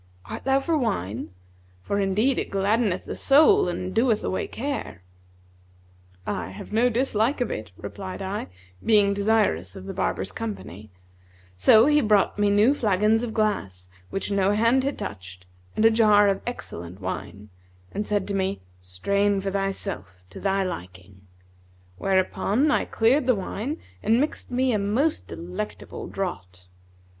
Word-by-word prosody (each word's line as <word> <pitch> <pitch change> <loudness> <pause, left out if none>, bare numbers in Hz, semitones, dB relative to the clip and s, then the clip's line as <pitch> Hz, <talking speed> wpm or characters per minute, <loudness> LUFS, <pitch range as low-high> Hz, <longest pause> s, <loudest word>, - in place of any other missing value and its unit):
Art - - -7
thou 270 0 +3
for 320 +4 0
wine?; 120 - -2 0.5
for 200 - -1
indeed 210 +7 +1
it - - -3
gladdeneth 200 0 +1
the - - -5
soul 280 - +5
and 180 +1 -4
doeth 230 -1 +2
away 185 - -2
care.' 265 - -5 1.2
'I - - -3
have 95 - -10
no 235 +3 +4
dislike 240 +1 +1
to 245 - 0
it,' 110 - -6
replied 190 -2 -7
I, 195 - -4 0.4
being 205 -3 +4
desirous 200 - +1
of 95 - -9
the - - -5
barber's - - -2
company; 105 -1 -7 0.7
so 215 - +6
he 295 +1 +4
brought 210 -3 +2
me 205 0 +3
new 210 +6 +4
flagons 215 -2 +2
of 240 - -3
glass 100 - -1 0.2
which 195 - -3
no 200 0 +2
hand 230 +5 +3
had 280 +1 -2
touched 95 -2 -8 0.3
and 215 - +2
a 225 - +7
jar 210 -2 +5
of 195 - -1
excellent 90 - -6
wine, 95 +2 -6 0.4
and 205 +1 -3
said 205 -2 0
to - - -1
me, 195 0 -1 0.2
'Strain 200 - 0
for 195 0 -3
thyself, 195 - -4
to - - -9
thy 195 0 +1
liking;' 95 - -8 0.7
whereupon 195 +8 +1
I - - +2
cleared 245 +4 +2
the 255 - +4
wine 215 - -4 0.2
and 225 +2 +3
mixed 295 +3 -2
me 255 +1 +1
a 215 - +1
most 235 +11 0
delectable 180 +5 -6
draught. 90 - -6
200 Hz, 150 wpm, -25 LUFS, -, 1.2 s, a